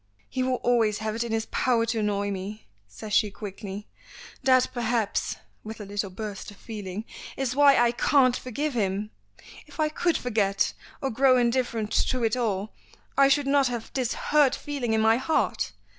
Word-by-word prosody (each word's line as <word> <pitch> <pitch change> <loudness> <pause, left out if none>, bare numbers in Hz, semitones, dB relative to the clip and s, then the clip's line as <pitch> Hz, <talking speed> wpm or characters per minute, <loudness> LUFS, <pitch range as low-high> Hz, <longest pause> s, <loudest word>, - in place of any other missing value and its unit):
"He 260 - -3
will 255 0 +1
always 230 -4 +2
have 215 0 -3
it 230 +2 -1
in 235 - -5
his 225 0 0
power 235 -3 +2
to 230 0 -1
annoy 205 -1 0
me," 200 +3 -6 0.2
says 200 - -8
she 210 0 +4
quickly. 200 0 -7 0.6
"That 255 -1 +4
perhaps," 235 -3 -1 0.3
with 220 +1 -8
a 210 - -7
little 200 0 -3
burst 205 +1 -6
of 205 - -13
feeling, 210 -2 -6 0.3
"is 260 -2 -1
why 285 -1 +6
I 240 0 +4
can't 255 0 +3
forgive 280 +5 -3
him. 205 -1 -1 0.6
If 295 - -15
I 310 0 +2
could 335 +2 0
forget, 210 -5 0 0.3
or 270 - 0
grow 255 +2 +4
indifferent 235 -3 0
to 255 -2 +1
it 225 0 +2
all, 215 -4 -2 0.4
I 275 0 +6
should 285 +1 +3
not 275 -1 +3
have 240 -2 -5
this 255 -3 -1
hurt 295 -3 +3
feeling 275 -6 -3
in 220 - +2
my 225 +1 +4
heart. 260 - 0
230 Hz, 180 wpm, -26 LUFS, 210-255 Hz, 0.6 s, why